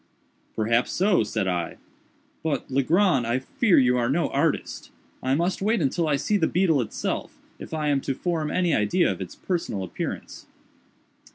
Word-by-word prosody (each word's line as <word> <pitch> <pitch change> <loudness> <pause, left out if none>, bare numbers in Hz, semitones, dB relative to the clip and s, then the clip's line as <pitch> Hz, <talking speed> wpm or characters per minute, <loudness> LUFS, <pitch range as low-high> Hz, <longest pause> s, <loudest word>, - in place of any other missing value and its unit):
"Perhaps 115 +3 +1
so," 190 - +3
said 105 -2 -1
I; 90 -2 -2 0.6
"but, 145 -4 -2
Legrand, 140 - +2
I 120 +2 +1
fear 180 - +2
you 125 -2 +4
are 120 0 +1
no 160 +4 +1
artist. - - -1 0.3
I 130 +1 +1
must 175 +5 0
wait 220 +3 +2
until 160 +2 0
I 150 - +2
see 205 +9 +1
the 160 -5 +2
beetle 170 -6 +2
itself, 110 - -4 0.2
if - - -9
I 155 -2 -1
am 140 -1 +2
to 135 - -2
form 165 -2 -2
any 175 0 +1
idea 105 - +2
of - - -6
its - - -7
personal 165 - -3
appearance." 90 - -6
145 Hz, 170 wpm, -25 LUFS, 125-175 Hz, 0.6 s, you